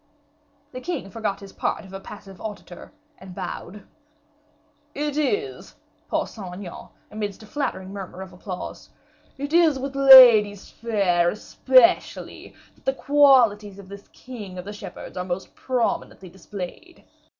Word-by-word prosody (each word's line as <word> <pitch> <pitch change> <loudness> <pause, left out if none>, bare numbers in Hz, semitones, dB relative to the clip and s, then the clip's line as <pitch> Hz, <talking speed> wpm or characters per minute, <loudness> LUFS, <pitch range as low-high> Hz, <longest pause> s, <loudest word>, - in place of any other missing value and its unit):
The 255 - -8
king 250 - -5
forgot 210 -1 -3
his 195 -1 -12
part - - -3
of 190 - -14
a 195 - -6
passive 195 -2 -12
auditor, 205 -5 -9 0.3
and 185 -1 -12
bowed. 195 +3 -7 1.1
"It 295 0 -2
is," 405 +8 -2 0.3
paused - - -2
Saint 195 -5 -8
Aignan, 185 -2 -9 0.2
amidst 210 -1 -5
a - - -12
flattering 210 -7 -4
murmur 190 -1 -7
of 185 -1 -13
applause, 180 0 -8 0.5
"it 285 +3 -5
is 330 -4 +4
with 275 +1 -5
ladies 240 -7 +8
fair 195 -7 +1
especially 260 - +1 0.2
that - - -29
the 265 - +1
qualities 250 -9 +4
of 195 -1 -13
this 200 0 -11
king 210 -8 -10
of 180 - -7
the 205 - -7
shepherds 205 - -10
are 180 - -2
most 180 +1 -5
prominently 235 -6 -2
displayed. 190 - -9
210 Hz, 140 wpm, -23 LUFS, 190-265 Hz, 1.1 s, ladies